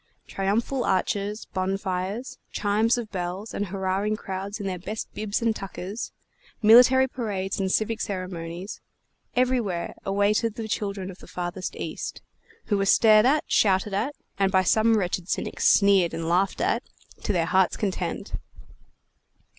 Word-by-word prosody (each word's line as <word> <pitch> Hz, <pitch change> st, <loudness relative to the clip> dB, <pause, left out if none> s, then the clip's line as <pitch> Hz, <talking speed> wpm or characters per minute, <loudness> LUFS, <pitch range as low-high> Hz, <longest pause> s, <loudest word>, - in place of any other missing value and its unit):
Triumphal 225 Hz, +7 st, -1 dB
arches, 200 Hz, +3 st, -1 dB
bonfires, 190 Hz, +4 st, -2 dB
chimes 215 Hz, +3 st, +2 dB
of 230 Hz, -3 st, -5 dB
bells, 185 Hz, +3 st, -4 dB
and 205 Hz, -, -2 dB
hurrahing 195 Hz, +3 st, -1 dB
crowds 195 Hz, +1 st, -5 dB
in 200 Hz, -, -5 dB
their 185 Hz, -2 st, -3 dB
best 215 Hz, +5 st, -6 dB
bibs 215 Hz, +1 st, -2 dB
and 225 Hz, -1 st, +2 dB
tuckers, 195 Hz, +2 st, -6 dB, 0.5 s
military 250 Hz, +4 st, +7 dB
parades 205 Hz, -7 st, -3 dB
and 190 Hz, -1 st, 0 dB
civic 220 Hz, +2 st, 0 dB
ceremonies, 185 Hz, -1 st, -5 dB, 0.5 s
everywhere 245 Hz, -9 st, 0 dB
awaited 205 Hz, +3 st, +1 dB
the 225 Hz, -1 st, -5 dB
children 200 Hz, -3 st, -3 dB
of 185 Hz, -, -14 dB
the -, -, -14 dB
farthest 180 Hz, +1 st, -4 dB
East, -, -, -5 dB, 0.4 s
who 205 Hz, -2 st, +1 dB
were 195 Hz, -, +1 dB
stared 215 Hz, +2 st, +6 dB
at, 295 Hz, +3 st, +3 dB
shouted 195 Hz, 0 st, +2 dB
at 250 Hz, +9 st, -1 dB, 0.2 s
and 195 Hz, -1 st, +3 dB
by 190 Hz, -1 st, +4 dB
some 220 Hz, +3 st, +4 dB
wretched 180 Hz, -2 st, -2 dB
cynics -, -, +1 dB
sneered 195 Hz, -4 st, +4 dB
and 165 Hz, 0 st, -3 dB
laughed 180 Hz, +3 st, +1 dB
at -, -, +1 dB, 0.4 s
to -, -, -1 dB
their 170 Hz, -4 st, +1 dB
hearts' 185 Hz, +1 st, +2 dB
content. 195 Hz, -3 st, -3 dB
200 Hz, 145 wpm, -25 LUFS, 185-220 Hz, 0.5 s, military